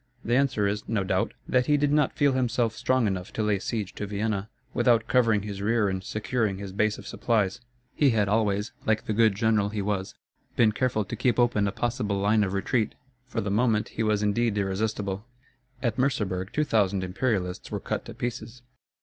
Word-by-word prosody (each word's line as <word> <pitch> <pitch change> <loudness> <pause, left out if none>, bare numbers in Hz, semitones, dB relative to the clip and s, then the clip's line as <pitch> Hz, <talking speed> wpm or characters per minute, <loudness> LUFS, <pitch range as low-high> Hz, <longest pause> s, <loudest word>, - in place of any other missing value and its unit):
The 120 - +2
answer 130 -6 +2
is, 105 +1 -2
no 105 -4 +1
doubt, 95 0 0
that 125 -1 +2
he 150 - +4
did 145 0 +1
not 150 -2 +2
feel 145 -1 +4
himself 120 -3 0
strong 130 0 +1
enough 95 -3 -2
to 110 - -1
lay 105 -2 +1
siege 105 -1 -3
to 105 - -5
Vienna, 105 0 -2 0.2
without 120 -2 +3
covering 115 -5 +3
his 100 -2 -5
rear 110 0 +2
and 95 0 -3
securing 105 -1 -1
his 100 -1 -6
base 105 +2 +1
of - - -11
supplies. 110 -1 0 0.3
He 145 - +3
had 110 -4 +2
always, 105 0 +1
like 110 0 0
the 110 - -1
good 110 -2 +4
general 110 -1 +2
he 105 -1 -3
was, 95 -2 -2 0.4
been 110 -2 +4
careful 110 -2 0
to - - -5
keep 125 -3 +1
open 120 -4 +3
a - - 0
possible 105 -3 -1
line 105 +2 +3
of 95 -1 -2
retreat. 110 +3 0 0.3
For - - -2
the 100 - -2
moment 110 0 +2
he - - -4
was 105 -1 +1
indeed 105 +1 +1
irresistible. 100 0 -1 0.6
At 120 -2 0
Merseburg 100 -8 0
two 150 - +1
thousand 100 -8 +1
Imperialists 95 -1 -2
were - - -3
cut - - -3
to - - -9
pieces. 120 -1 -5
110 Hz, 200 wpm, -27 LUFS, 100-120 Hz, 0.6 s, he